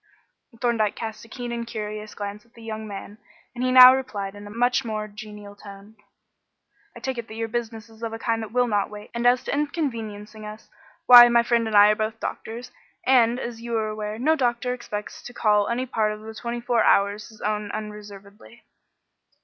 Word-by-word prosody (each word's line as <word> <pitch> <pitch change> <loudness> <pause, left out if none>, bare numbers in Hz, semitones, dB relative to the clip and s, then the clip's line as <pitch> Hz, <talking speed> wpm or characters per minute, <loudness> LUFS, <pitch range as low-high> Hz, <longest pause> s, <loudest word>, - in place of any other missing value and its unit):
Thorndyke 230 -4 +1
had - - -9
cast 220 -1 -6
a - - -16
keen 240 +1 -6
and 235 0 -4
curious 215 -1 -6
glance 205 0 -6
at 235 0 -31
the 230 - -14
young 220 -1 -6
man, 205 +1 -9 0.3
and 245 0 -4
he 255 - +1
now 255 0 +10
replied 205 -7 -4
in 205 0 -11
a - - -9
much 245 +4 +1
more 215 -2 -4
genial 210 -1 -11
tone 200 +1 -13 1.0
"I - - -9
take 260 -2 -4
it 235 - -7
that 220 - -10
your 225 0 -3
business 225 -1 -5
is 225 0 -18
of 230 -1 -3
a 225 - -5
kind 225 0 -1
that 220 -2 -7
will 250 +1 +2
not 205 -4 0
wait, 210 0 -11
and 235 +1 +1
as 250 +1 +3
to - - -3
inconveniencing 225 -8 -4
us, 215 +1 -10 0.3
why, 240 -1 +10
my 235 0 +4
friend 235 -1 +1
and 215 -1 +2
I 205 +1 +8
are - - +1
both 220 +1 -3
doctors, 235 +3 -6 0.3
and, 245 -2 +4
as 235 -2 -6
you 235 -1 -2
are 215 -1 -1
aware, 215 0 -5
no 305 +7 +2
doctor 250 -2 0
expects 210 -4 -7
to 245 - -11
call 210 -2 +2
any 245 +2 -1
part 220 -4 0
of 210 - -10
the 220 +1 -9
twenty 235 +2 -5
four 235 -1 +1
hours 205 +2 +2
his 220 - -17
own 210 -1 -2
unreservedly." 210 +1 -9
225 Hz, 215 wpm, -24 LUFS, 210-240 Hz, 1.0 s, now